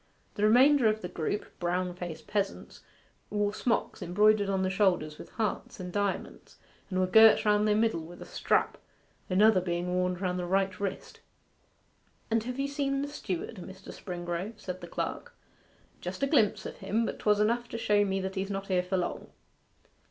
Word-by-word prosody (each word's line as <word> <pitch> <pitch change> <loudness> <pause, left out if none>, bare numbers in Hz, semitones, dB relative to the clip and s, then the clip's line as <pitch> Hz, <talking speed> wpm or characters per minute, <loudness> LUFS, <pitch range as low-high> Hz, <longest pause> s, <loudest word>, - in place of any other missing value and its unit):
The 205 - -5
remainder 250 +4 +6
of 215 0 +1
the - - -2
group, 180 +3 -3
brown 180 +1 -1
faced 175 -2 -7
peasants, 200 -2 -3 0.5
wore 205 0 0
smock 230 +1 +1
frocks - - -17
embroidered 205 +3 +3
on 190 -1 +1
the 185 - +1
shoulders 180 -6 +1
with - - -10
hearts 235 +2 -3
and 180 -1 -6
diamonds, 205 -1 -3 0.3
and 185 -1 -1
were 185 - +3
girt 220 +4 +7
round 210 0 +3
their 210 - +3
middle 220 -5 +2
with 170 +2 -11
a - - -8
strap, - - 0 0.5
another 195 +1 +5
being 175 0 -2
worn 180 0 +1
round 180 0 -2
the 175 - -3
right 190 0 0
wrist. 200 -2 -5 1.1
'And 225 0 +1
have 250 +2 -4
you 275 - 0
seen 280 -1 -1
the - - -3
steward, 210 - -5
Mr. 190 +1 -10
Springrove?' 175 +3 -5
said 185 -2 -6
the - - -7
clerk. - - -4 0.6
'Just - - -5
a - - +6
glimpse 270 -8 +2
of - - -7
him; 225 +2 0
but - - -4
'twas 210 -1 +3
just 210 - +3
enough 240 +2 -1
to - - -4
show 210 -2 +3
me 195 -1 -1
that 190 0 -3
he's 195 +1 -3
not 195 0 -4
here 185 -1 +3
for 180 +1 -2
long. 175 - -3
195 Hz, 190 wpm, -29 LUFS, 180-220 Hz, 1.1 s, girt